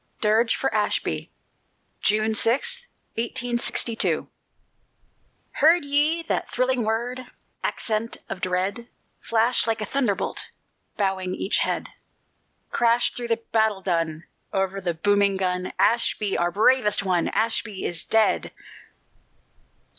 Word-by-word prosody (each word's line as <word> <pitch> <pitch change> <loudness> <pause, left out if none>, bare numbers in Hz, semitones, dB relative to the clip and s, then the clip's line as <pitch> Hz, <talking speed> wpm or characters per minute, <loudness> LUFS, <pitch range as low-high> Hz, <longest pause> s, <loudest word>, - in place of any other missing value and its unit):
DIRGE 220 +2 +3
FOR - - -1
ASHBY - - -1 0.7
[June 215 +1 +2
6, 475 - +2 0.3
1862] 235 0 0 1.3
Heard 320 +1 +4
ye 300 +4 +1
that - - -2
thrilling 255 -1 0
word 240 +3 -2 0.4
Accent 225 +1 -2
of 185 - -6
dread 190 +6 -2 0.3
Flash 230 +1 +2
like 225 -1 0
a 215 - -2
thunderbolt, 210 -4 0 0.5
Bowing 190 -2 -1
each 195 - +1
head, - - -1 0.8
Crash 235 0 +2
through 240 -1 -4
the 230 0 -1
battle 220 -3 +2
dun, 165 -3 -1 0.3
Over 195 0 -1
the 175 -3 -2
booming 200 +2 +2
gun, 180 -1 -1
"_Ashby, 220 -3 +2
our 175 - +1
bravest 210 +2 +3
one, 180 -3 +1
Ashby 220 -2 -1
is 170 -2 -2
dead! 220 -1 +2
220 Hz, 110 wpm, -24 LUFS, 195-240 Hz, 1.3 s, Heard